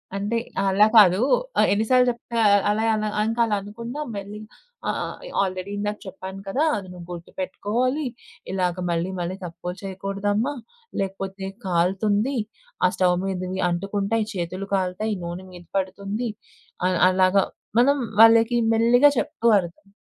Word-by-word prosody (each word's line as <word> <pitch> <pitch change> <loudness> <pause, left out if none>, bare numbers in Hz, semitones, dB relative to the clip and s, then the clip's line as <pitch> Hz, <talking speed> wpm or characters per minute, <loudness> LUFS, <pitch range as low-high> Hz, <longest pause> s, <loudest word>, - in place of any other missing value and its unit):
అంటే 205 +4 -1 0.3
అలా 195 +2 +4
కాదు. 190 -4 +7 0.4
ఆహ్, - - +5
ఎన్ని 215 +2 +1
సార్లు 255 -1 +5
జేప్తే 235 0 -5
ఆహ్, 205 -1 +5
అలా 210 +2 +1
అలా, 215 0 -1 0.2
ఇంకలా 225 -1 +1
అనకుండా 230 +7 -7 0.2
మెల్లి 200 +1 -6 0.5
ఆ! - - +3 0.4
ఎ - - -8
ఆల్రెడీ 185 0 -3
ఇందాక 210 +1 -2
చెప్పాను 190 0 -8
కదా! 260 +10 0
అది 195 -2 -7
నువ్వు 175 -1 -10
గుర్తుపెట్టుకోవాలీ, 210 - -2 0.5
ఇలాగ 180 -2 0 0.2
మళ్ళీ 170 +2 -1
మళ్ళీ 175 +1 -3
తప్పులు 175 +1 -6
చెయకూడదమ్మా, 195 +6 -2 0.5
లేకపోతే 195 0 -4 0.2
కాలుతుంది, 200 +8 +1 0.5
ఆ - - +5
స్టవ్ 180 -1 +3
మీదవి 185 -1 -3
అంటుకుంటాయి, 200 +5 -1
చేతులు 185 +1 -4
కాలుతాయి, 190 +3 -1
నూనె 175 +2 -6
మీద 175 -1 -12
పడుతుంది, 200 +5 -3 0.6
అల్ 185 -2 +1
అలాగ 185 +1 +3 0.4
మనం 280 +4 +4 0.2
వాళ్ళకి 225 +1 +6 0.2
మెల్లిగా 240 +5 +5
చెప్తూ 265 -6 -2
అర్థం 175 +2 -8
195 Hz, 135 wpm, -24 LUFS, 185-225 Hz, 0.6 s, కాదు